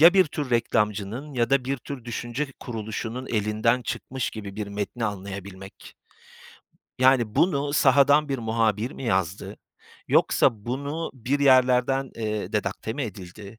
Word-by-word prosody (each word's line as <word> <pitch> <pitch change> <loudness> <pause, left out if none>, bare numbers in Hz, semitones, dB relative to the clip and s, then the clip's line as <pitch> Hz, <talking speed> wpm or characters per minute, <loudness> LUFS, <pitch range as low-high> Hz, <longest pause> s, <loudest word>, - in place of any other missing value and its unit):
Ya, 170 +4 +8
bir 190 -1 +6
tür 145 -3 -5
reklamcının 115 +3 0
ya 120 -1 +1
da 135 -2 +3
bir 135 +2 -1
tür 130 -1 -8
düşünce 120 +4 -3
kuruluşunun 115 +2 -5
elinden 110 +3 +1
çıkmış 120 +3 -3
gibi 100 -3 -8
bir 105 -1 -3
metni 105 +4 -4
anlayabilmek. 100 -1 -7 1.0
Yani, 130 -4 +4
bunu 145 -5 +2
sahadan 145 +2 +5
bir 135 -1 -1
muhabir 110 0 0
mi - - -8
yazdı? 95 -5 -1 0.5
Yoksa - - +4 0.2
bunu 140 +6 -3
bir 130 +3 -1
yerlerden, 130 0 +4
eee, 110 -2 -3
redakte 105 +1 -2
mi 145 - -3
edildi? 100 0 -8
120 Hz, 135 wpm, -25 LUFS, 105-135 Hz, 1.0 s, Ya